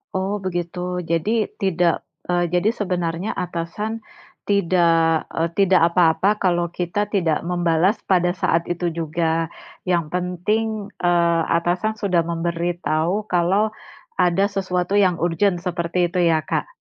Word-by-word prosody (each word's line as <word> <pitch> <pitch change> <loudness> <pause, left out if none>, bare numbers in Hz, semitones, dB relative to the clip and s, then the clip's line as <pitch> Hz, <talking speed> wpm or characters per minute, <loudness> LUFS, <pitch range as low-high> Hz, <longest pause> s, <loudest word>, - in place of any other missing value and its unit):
Oh 195 +2 -2
begitu. 180 0 -3
Jadi, 210 +6 +1
tidak, 175 -3 +1 0.2
eee 175 0 +1
jadi 180 +4 +3
sebenarnya 180 -1 -2
atasan 185 +6 -4 0.4
tidak, 170 -4 +2
eee, 165 +1 -1
tidak 190 -3 +4
apa-apa 180 +4 +3
kalau 175 -3 +1
kita 175 +4 -2
tidak 175 -7 +1
membalas 175 +2 +2
pada 180 -1 +2
saat 165 +1 0
itu 175 0 -1
juga, 165 0 -1 0.4
yang 170 -4 0
penting, 200 +4 -2
eee, 170 -1 +2 0.2
atasan 180 +6 -1
sudah 185 -6 0
memberitahu 170 +2 -1
kalau 190 +5 +2 0.5
ada 180 +2 +3
sesuatu 185 -1 -1
yang 185 -3 +3
urgent 175 +1 +1
seperti 175 -1 -1
itu 180 - -1
ya, 160 -1 +1
Kak? - - -2
175 Hz, 125 wpm, -21 LUFS, 170-190 Hz, 0.5 s, tidak